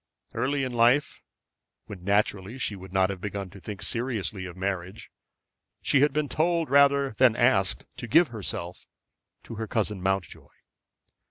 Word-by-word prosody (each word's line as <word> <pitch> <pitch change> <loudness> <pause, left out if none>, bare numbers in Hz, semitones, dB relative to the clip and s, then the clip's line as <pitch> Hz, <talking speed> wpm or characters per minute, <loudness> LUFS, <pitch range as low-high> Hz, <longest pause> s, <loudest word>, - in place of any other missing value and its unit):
Early 135 +4 0
in 130 - -2
life, 120 +4 +2 0.6
when 95 -4 -10
naturally 100 +2 0
she 110 -5 -2
would 95 -1 -11
not 95 0 +2
have 95 -2 -7
begun 100 -2 -5
to 100 - -12
think 100 +1 -7
seriously 115 -5 -2
of 90 -1 -9
marriage, 95 +1 -4 0.7
she 135 - +2
had 145 - +4
been 150 +1 -1
told 165 -1 0
rather 140 -1 +4
than 125 -4 +5
asked 105 -6 +2
to 120 - -6
give 165 +7 +5
herself 90 -6 -5 0.6
to 115 - -9
her 110 - -3
cousin 105 -3 -1
Mountjoy. 95 -3 -2
110 Hz, 155 wpm, -27 LUFS, 95-130 Hz, 0.7 s, than